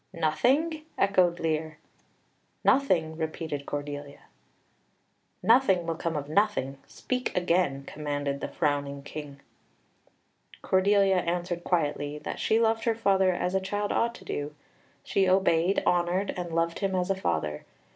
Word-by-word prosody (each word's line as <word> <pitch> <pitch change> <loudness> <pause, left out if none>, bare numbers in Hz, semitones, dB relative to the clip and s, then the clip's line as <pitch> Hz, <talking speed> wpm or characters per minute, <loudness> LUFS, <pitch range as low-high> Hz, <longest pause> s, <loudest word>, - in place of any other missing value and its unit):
"Nothing!" 265 - +1
echoed 185 -3 +3
Lear. 155 -1 -2 0.9
"Nothing," 170 -13 +2
repeated 160 -3 -4
Cordelia. 145 0 -5 1.2
"Nothing 220 -7 +4
will 165 - -1
come 165 0 -3
of 145 -1 -3
nothing. 155 -7 0
Speak 255 -5 -3
again," 175 -6 +1
commanded 145 -2 -3
the - - -2
frowning 140 -1 -1
King. 145 -1 -8 1.2
Cordelia 195 0 +3
answered 175 0 -2
quietly 145 -4 -1
that - - -6
she 220 - +2
loved 225 0 +1
her 230 -1 +2
father 195 -4 +3
as 180 +1 -2
a 190 - +1
child 205 +2 -2
ought 235 0 +1
to - - -13
do 145 +1 -4 0.5
she 195 -1 +1
obeyed, 185 -1 +3
honoured, 180 +3 +1
and 175 -2 -5
loved 165 0 0
him 195 -2 -1
as 180 +1 0
a - - +1
father. 80 - -2
175 Hz, 135 wpm, -28 LUFS, 150-195 Hz, 1.2 s, Nothing